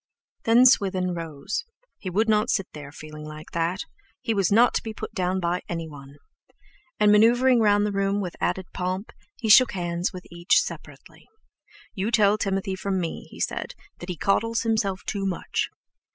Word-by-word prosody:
Then 235 +3 +6
Swithin 190 -7 +3
rose. 165 - -4 0.4
He 185 - -5
would 215 +5 +1
not 215 +1 +2
sit 195 - +1
there, 145 -2 -9
feeling 155 0 -10
like 155 0 -10
that—he 225 - -4
was 195 -3 +1
not 235 +4 +5
to - - 0
be 220 -1 -7
put - - -7
down 185 -2 0
by 175 0 -1
anyone! 150 -5 -7 0.8
And, 210 0 +5
manoeuvring 240 +4 +5
round 205 -1 +4
the 210 - -1
room 195 0 0
with 180 -4 -4
added 190 - -1
pomp, 185 +3 -3 0.2
he 235 - -4
shook 245 +4 +7
hands 175 -1 -2
with 180 -1 -9
each 170 - +3
separately. - - -8 0.7
"You 195 +3 -2
tell 215 -2 +3
Timothy 195 -1 -1
from 190 0 -2
me," 170 -2 -4
he - - -13
said, - - -3 0.2
"that 175 - -9
he 180 - -4
coddles 230 +6 +1
himself 215 -4 0
too 200 -2 -3
much!" 180 - -2
195 Hz, 170 wpm, -25 LUFS, 175-220 Hz, 0.8 s, shook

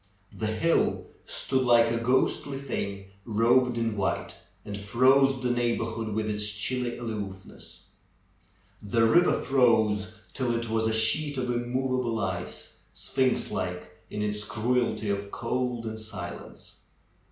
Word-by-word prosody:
The 110 - -2
hill 135 +10 +1 0.2
stood 130 -1 0
like 120 -2 +5
a 115 - 0
ghostly 130 +3 +1
thing 100 -8 -5
robed 120 +3 +3
in 115 -2 0
white, 100 - -1 0.3
and 100 - -5
froze 130 +6 +3
the 125 - +1
neighborhood 115 -2 -1
with 110 0 -1
its 105 0 0
chilly 120 +4 -2
aloofness. 105 -5 -7 1.0
The 115 +3 +2
river 175 +10 +4
froze 110 -6 +3 0.2
till 125 -3 0
it 115 0 -2
w^as 110 0 0
a - - 0
sheet 135 +7 +2
of 125 -1 -1
immovable 120 0 -1
ice, 95 -4 -4
sphinx 130 -1 0
like 90 -3 -4 0.2
in 105 - -3
its 105 0 -1
cruelty 110 0 0
of 100 0 -3
cold 125 +1 -2
and 110 0 -5
silence. 105 -5 -8
115 Hz, 130 wpm, -27 LUFS, 105-125 Hz, 1.0 s, like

